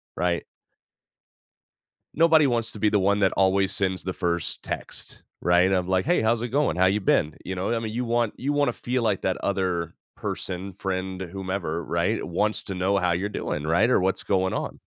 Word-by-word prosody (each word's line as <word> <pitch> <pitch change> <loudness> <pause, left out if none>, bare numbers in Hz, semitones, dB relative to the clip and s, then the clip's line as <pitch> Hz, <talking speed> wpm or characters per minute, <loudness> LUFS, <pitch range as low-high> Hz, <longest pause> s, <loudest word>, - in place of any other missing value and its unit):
right? 85 0 0 1.7
Nobody 160 -2 +6
wants 115 -2 0
to 105 - -9
be 105 - +3
the 105 - +2
one 100 +2 +2
that 95 -2 +3
always 95 0 +2
sends 95 -2 0
the 95 - -3
first 85 -3 -2
text, - - -4 0.2
right? 90 +1 +4
Of 90 -1 0
like, 95 0 +2
"Hey, 175 - +2
how's 110 +1 +2
it 120 - -2
going? 135 - +1
How 95 - +4
you 100 +3 +2
been?" 80 -4 +2
You 95 - -4
know 90 +1 -3
what - - 0
I - - 0
mean? 110 -1 -4
You 120 +3 -2
want 120 -1 +1
you 145 +3 -1
wanna 145 0 +2
feel 125 0 -2
like 105 -4 +1
that 95 - 0
other 90 -4 -1 0.2
person, 95 +1 -4
friend, 95 0 -3
whomever, 95 -2 -3
right, - - -1
wants 105 +1 0
to 95 - -5
know 95 +2 +1
how 90 -2 +1
you're 90 +4 0
doing, 75 -7 -3
right, 85 +9 +3
or - - +4
what's 95 +1 0
going 95 -1 +1
on. - - -4
95 Hz, 205 wpm, -25 LUFS, 90-110 Hz, 1.7 s, Nobody